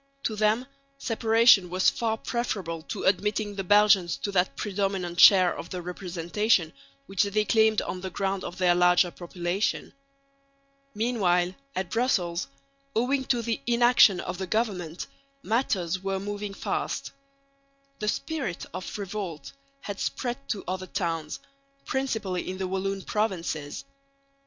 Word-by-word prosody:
To 220 - -1
them 215 +4 +2 0.3
separation 225 -5 +4
was 185 +1 +3
far 225 -1 -1
preferable 195 -10 -3
to - - -4
admitting 205 +2 +1
the 195 -1 -4
Belgians 195 -5 +4
to 200 - -1
that 185 -1 +1
predominant 195 -4 -2
share 185 -3 +8
of - - -8
the 185 - -4
representation 180 +1 0 0.3
which 195 -5 0
they 210 +1 +1
claimed 220 +1 +3
on 185 - -5
the 190 - -4
ground 195 0 -2
of 175 - -6
their 180 -2 +4
larger 180 0 +4
population. 175 +3 -3 1.0
Meanwhile 190 -6 +1 0.2
at 185 -1 -3
Brussels, 185 -8 0 0.5
owing 260 +4 +1
to 240 -3 0
the 230 -1 -2
inaction 240 -5 +5
of 180 +1 -5
the 190 - -3
government, 185 -6 -2 0.4
matters 190 -6 0
were 195 0 -2
moving 205 0 -5
fast. - - -3 0.9
The 210 - -3
spirit 265 - -2
of 185 - -6
revolt 195 -7 -5 0.3
had 200 -1 -6
spread 255 +2 -3
to 205 - -2
other 185 +1 -3
towns, 165 -6 -3 0.5
principally 220 -10 -2
in 185 - -4
the 190 0 -2
Walloon 190 +1 -2
provinces. 170 - -2
195 Hz, 135 wpm, -27 LUFS, 180-220 Hz, 1.0 s, share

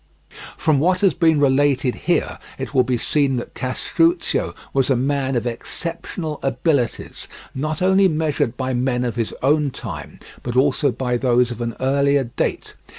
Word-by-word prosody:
From 155 -3 +2
what 180 +4 +2
has 195 -2 +4
been 160 -3 +3
related 135 -2 +3
here - - -1 0.2
it - - -6
will 130 - +5
be 125 0 0
seen 140 +2 +1
that 120 - -6
Castruccio 165 +7 0 0.2
was 135 -1 +2
a 135 - +4
man 135 +1 0
of 120 - -1
exceptional 155 +5 -4
abilities, 135 -1 -1 0.3
not 155 +5 -2
only 190 +1 +5
measured 150 -6 -1
by 130 -1 -2
men 125 0 0
of 120 - -2
his 115 -2 -1
own 145 +1 +3
time, 90 - -8 0.2
but 120 0 -4
also 140 +1 +3
by 125 0 -1
those 125 -1 +2
of 120 0 -6
an 115 0 -3
earlier 140 +1 +2
date. 120 - -3
135 Hz, 160 wpm, -21 LUFS, 125-150 Hz, 0.3 s, will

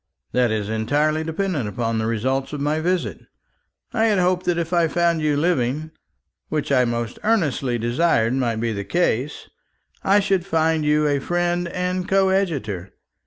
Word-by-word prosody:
"That 125 -1 +2
is 110 -2 -1
entirely 145 +8 0
dependent 160 - -2
upon 115 +2 -2
the 110 - -1
result 130 +5 -1
of 145 - -3
my 150 +2 0
visit. 180 +2 -1 0.7
I 225 - +2
had 215 -3 +3
hoped 180 0 +1
that 175 -1 +2
if 170 +1 -2
I 170 -1 +3
found 170 0 +1
you 150 -2 +1
living, 150 -1 0 0.6
which 150 -2 -2
I 130 -2 +4
most 120 -1 -3
earnestly 145 - +1
desired 120 0 +1
might 125 -3 0
be 115 0 -1
the 100 -1 -4
case, 145 - -1 0.6
I 200 +2 +4
should 195 -3 +1
find 160 -3 +1
in 150 - +1
you 150 0 +3
a 145 -1 +1
friend 175 +3 0
and 180 +1 -2
coadjutor. 175 - 0
155 Hz, 165 wpm, -22 LUFS, 120-175 Hz, 0.7 s, I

